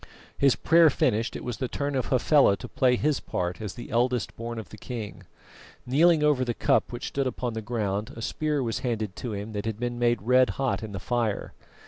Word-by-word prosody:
His 140 -2 +4
prayer 165 0 +5
finished, 115 -4 0
it - - -6
was 125 -3 -4
the 130 - -2
turn 145 +3 -3
of 130 -3 -1
Hafela 130 -4 +4
to - - -8
play 125 -1 +2
his 145 +3 +1
part 90 +3 -3
as 105 -2 -5
the 120 - -9
eldest 120 +1 0
born 115 0 -5
of 110 - -7
the 110 - -11
king. 115 -5 -7 0.6
Kneeling 155 +4 +4
over 145 -4 +3
the 120 -2 -2
cup - - +2
which 120 +2 -5
stood 135 -1 -1
upon 125 -2 -3
the 110 - -4
ground, 105 -2 -2
a 115 - -8
spear 150 0 -1
was 115 +1 -2
handed 110 -7 -2
to 120 -4 -4
him 100 +2 -5
that 105 +1 -4
had 110 -1 -3
been 120 0 -3
made 120 -4 +1
red 125 +2 +4
hot 135 -3 0
in 110 -1 -6
the 95 - -4
fire. 120 -3 -2
120 Hz, 220 wpm, -26 LUFS, 110-130 Hz, 0.6 s, prayer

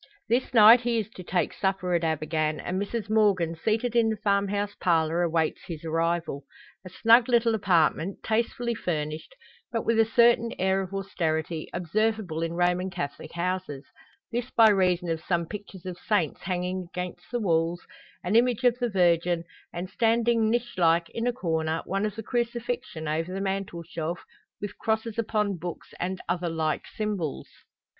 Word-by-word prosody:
This 240 +3 +1
night 230 +1 +8
he 240 -1 0
is 220 -2 -2
to 185 - -10
take 180 +1 0
supper 190 -2 -1
at 170 - +2
Abergann, 155 -1 0
and 185 +2 -2
Mrs 205 +1 -3
Morgan, 200 -6 +2
seated 220 +7 -1
in 230 -1 +4
the 220 - -1
farm 200 -1 +1
house 205 +1 -2
parlour, 165 -1 +2
awaits 165 -2 0
his 165 -2 -7
arrival. 165 -2 -1 0.4
A 185 - -9
snug 230 +6 +5
little 235 -1 +3
apartment, 185 -2 +1
tastefully 235 +2 0
furnished, 155 - -4 0.4
but 230 -2 -2
with 230 -1 +2
a 225 - +6
certain 235 0 +4
air 190 +1 +1
of 190 -1 -6
austerity, 165 -5 -2
observable 190 -1 -1
in 165 0 -2
Roman 180 +1 +1
Catholic 145 -6 -6
houses: 175 -5 -3 0.5
this 240 +1 -2
by 225 -3 +6
reason 180 -3 +2
of 165 -1 -2
some 170 -2 0
pictures 195 -1 -9
of 180 -1 -6
saints 180 -9 0
hanging 180 0 -3
against 180 -1 -6
the 240 - -1
walls, 170 -3 0 0.4
an 180 +5 0
image 245 0 +3
of 245 -1 +3
the 245 -1 0
Virgin 175 -3 +2 0.3
and, 175 +2 -5
standing 230 +2 +2
niche 240 -3 -1
like 170 0 +3
in 230 +1 -2
a - - +3
corner, 160 -8 -1
one 195 +2 0
of 210 - -7
the 225 - -6
Crucifixion 235 -8 -3
over 165 +3 -1
the 190 - -3
mantelshelf, 175 -4 -3 0.4
with 205 -1 -6
crosses 220 0 -1
upon 210 -3 0
books, 175 0 -7
and 185 +1 -2
other 175 -1 -1
like 160 -2 -1
symbols. 205 -9 -3
190 Hz, 165 wpm, -27 LUFS, 170-220 Hz, 0.5 s, night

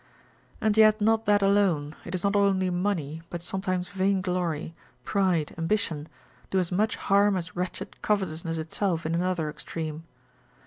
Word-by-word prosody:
And 215 -1 +1
yet 215 0 +6
not 220 +1 +2
that 205 -1 +4
alone, 185 -7 +2
it 175 - -4
is 180 - -3
not 200 0 +1
only 195 -2 +3
money, 175 -5 -1
but 175 -1 -6
sometimes 185 -1 -2
vainglory, 185 -5 -1 0.3
pride, 185 -6 +1
ambition, 165 -4 -1 0.4
do 190 - 0
as 180 -2 0
much 210 +4 +1
harm 200 0 +3
as 180 0 -5
wretched 180 +1 -5
covetousness 165 -5 -1
itself 165 +1 -1
in 160 - -1
another 175 -2 0
extreme. 155 +1 -5
185 Hz, 145 wpm, -27 LUFS, 165-200 Hz, 0.4 s, yet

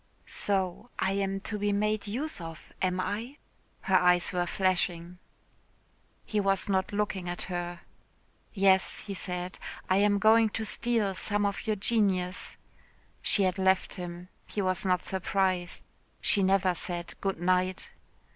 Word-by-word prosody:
"So 195 +3 -1
I 190 - +1
am 195 0 -1
to 210 +1 -4
be 205 0 +1
made 210 +1 0
use 245 - -3
of, 165 -1 -9
am 185 -1 +1
I?" 225 +9 -3 0.4
Her 190 -1 +3
eyes 180 -1 +3
were 175 -1 0
flashing. 180 -1 0 1.1
He 215 - -1
was 195 -1 +1
not 190 -2 +1
looking 205 -3 -2
at 175 - -4
her. 175 -1 -4 0.7
"Yes," 190 -2 +3
he 200 - -6
said, 180 -1 -4 0.3
"I 185 - +5
am 205 0 +4
going 220 +2 +5
to 220 - -3
steal 220 -3 +1
some 205 +2 0
of 200 +3 -2
your 215 - +2
genius." 190 -4 +1 0.6
She 200 - +4
had 185 0 0
left 190 0 +2
him. 175 -1 -7 0.2
He - - -5
was 185 0 0
not 180 -1 +1
surprised. 190 -1 -1 0.4
She 205 - +3
never 190 -1 +3
said 175 0 -3
"Good 195 -3 -1
night." 185 +1 +1
190 Hz, 145 wpm, -29 LUFS, 180-205 Hz, 1.1 s, I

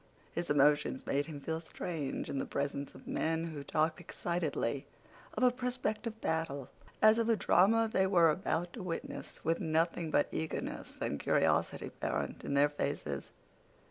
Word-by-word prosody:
His 170 0 -3
emotions 145 -2 +3
made 145 +2 0
him 150 -3 -6
feel 160 +3 -2
strange 160 -3 -4
in 140 - -2
the - - -1
presence 140 0 -3
of - - -13
men 165 +1 0
who 145 -2 -6
talked 155 +4 +1
excitedly 165 -7 -2 0.5
of - - 0
a 250 - +7
prospective 245 -3 -2
battle 160 - -2 0.3
as 215 +1 +7
of 230 0 +1
a 230 - +5
drama 220 +3 +4
they 190 -4 +2
were 170 -4 +5
about 175 +1 -1
to 230 - -6
witness, 175 -2 -6
with 165 +1 +2
nothing 165 +1 +1
but 145 - +3
eagerness 160 - -4
and 70 - -2
curiosity - - +2
apparent - - -3
in 140 - -2
their 145 +1 +5
faces. 75 - -3
160 Hz, 160 wpm, -33 LUFS, 145-190 Hz, 0.5 s, a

